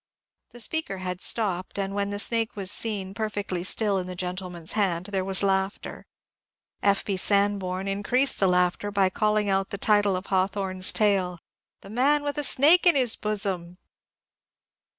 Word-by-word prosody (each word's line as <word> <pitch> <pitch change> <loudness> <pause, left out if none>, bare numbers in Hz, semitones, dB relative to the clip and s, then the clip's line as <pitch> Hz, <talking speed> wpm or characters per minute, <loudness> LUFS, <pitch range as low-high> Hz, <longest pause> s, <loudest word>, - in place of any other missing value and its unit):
The 240 - -14
speaker 275 -4 -3
had 180 0 -5
stopped, 190 -6 -1
and 195 0 -2
when 200 0 -1
the 205 - -3
snake 225 +2 0
was 195 -2 +1
seen 200 -4 -1
per 220 +1 -3
fectly 195 -4 -4
still 200 +1 +1
in 180 - -5
the 180 - -6
gentleman's 180 -2 -5
hand 185 -5 0
there 190 -2 -1
was 190 +1 -2
laughter. 195 0 -2 0.7
F. 200 -1 +1
B. 195 -2 -2
Sanborn 195 -1 0
increased 235 +7 +1
the 195 - +3
laughter 180 +2 +1
by 195 -2 +1
calling 210 +1 0
out 195 0 0
the 200 - -5
title 205 -1 +2
of 185 +2 -5
Hawthorne's 190 -1 +1
tale, 195 -4 +1
^^ - - -12 0.4
The 195 - -12
Man 285 +6 +2
with 290 0 -2
a - - -1
Snake 310 +7 +5
in 345 - +6
his 250 -4 +2
Bosom." 195 -5 -3
200 Hz, 170 wpm, -25 LUFS, 185-215 Hz, 0.7 s, in